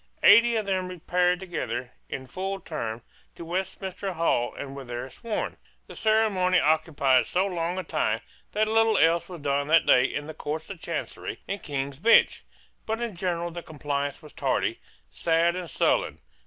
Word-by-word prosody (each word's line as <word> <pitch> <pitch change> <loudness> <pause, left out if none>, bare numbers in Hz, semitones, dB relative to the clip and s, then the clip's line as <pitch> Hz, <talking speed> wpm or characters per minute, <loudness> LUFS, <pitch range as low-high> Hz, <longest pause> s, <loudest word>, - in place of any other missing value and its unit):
Eighty 230 +3 +7
of 215 -2 0
them 190 -2 -1
repaired 180 0 +1
together, 130 -9 -4 0.2
in 130 - -5
full 190 +8 -4
term, 115 -10 -5 0.3
to 170 - -8
Westminster 190 +2 -3
Hall, 160 -8 +1
and 140 -1 -7
were 140 - -7
there 120 0 -5
sworn. 230 -3 -4 0.3
The - - -11
ceremony 205 -5 +3
occupied 150 -4 +3
so 185 +2 +1
long 175 -2 -2
a 185 - -2
time - - 0 0.3
that 215 +1 +2
little 225 -1 +3
else 170 +1 +3
was 175 -4 -8
done 140 0 0
that 160 +1 +5
day 125 0 +6
in 145 +2 -3
the 155 - -7
Courts 155 +3 -5
of 180 -4 -9
Chancery 170 -2 -5
and 200 0 -3
King's 140 -1 -4
Bench, 230 +7 +5 0.4
But 220 +1 -1
in 235 -5 -3
general 175 -1 -2
the 175 +1 -6
compliance 145 -1 -3
was 150 - -13
tardy, - - 0 0.3
sad 165 - +2
and 180 -2 -5
sullen. - - +1
170 Hz, 170 wpm, -26 LUFS, 145-190 Hz, 0.4 s, Eighty